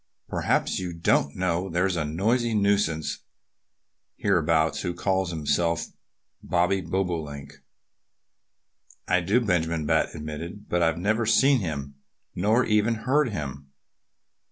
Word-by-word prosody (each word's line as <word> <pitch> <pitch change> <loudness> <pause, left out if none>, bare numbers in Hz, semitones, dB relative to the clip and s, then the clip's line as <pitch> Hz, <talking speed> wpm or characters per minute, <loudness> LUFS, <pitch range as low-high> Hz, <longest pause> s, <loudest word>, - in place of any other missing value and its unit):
"Perhaps - - 0
you 90 -2 -4
don't 80 -3 +1
know 90 +1 -1
there's 90 +2 +1
a 80 - 0
noisy 110 +10 0
nuisance 100 -6 +1 1.0
hereabouts 80 -1 +1
who 90 -2 -3
calls 95 -2 0
himself 85 +1 0 0.6
Bobby 90 +2 +1
Bobolink?" 80 -6 -4 1.5
"I 90 0 +3
do," 100 +8 +2
Benjamin 85 -6 0
Bat 80 +2 +1
admitted. 80 +6 -7
"But 90 - 0
I've 80 -1 +2
never 110 +5 0
seen 135 +3 +4
him 70 -7 -5 0.4
nor 110 +7 +2
even 105 +2 +2
heard 140 +1 +3
him." 70 - -6
90 Hz, 115 wpm, -26 LUFS, 80-100 Hz, 1.5 s, seen